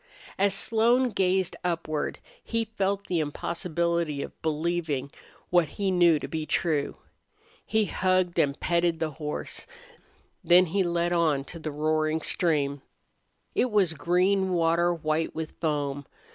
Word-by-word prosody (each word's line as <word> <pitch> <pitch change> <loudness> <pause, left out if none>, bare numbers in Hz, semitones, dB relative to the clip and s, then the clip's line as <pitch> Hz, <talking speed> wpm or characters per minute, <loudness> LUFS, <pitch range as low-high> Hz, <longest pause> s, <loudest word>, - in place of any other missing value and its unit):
As 200 0 +3
Slone 235 +5 +3
gazed 190 -3 +1
upward 165 -3 -2 0.3
he 230 -1 -1
felt 200 -2 -2
the 175 - -1
impossibility 170 0 -1
of - - -11
believing 155 -3 -1 0.4
what 175 -3 +4
he 195 -2 0
knew 175 -3 +5
to - - -5
be 155 -1 -4
true. 155 -4 0 0.7
He 220 -1 +1
hugged 185 -2 +1
and 140 0 +1
petted 170 -1 +1
the 160 -1 -1
horse. 150 0 -6 0.8
Then 180 +1 +6
he 200 - +3
led 175 -1 0
on 155 -5 +2
to 165 +4 -9
the 155 -1 -4
roaring 155 +1 0
stream. 145 -5 0 0.7
It 255 - +1
was 200 -6 +2
green 185 +5 +1
water 170 0 +2
white 160 -1 -1
with 160 -1 -4
foam. 145 -3 -2
170 Hz, 135 wpm, -27 LUFS, 155-185 Hz, 0.8 s, Then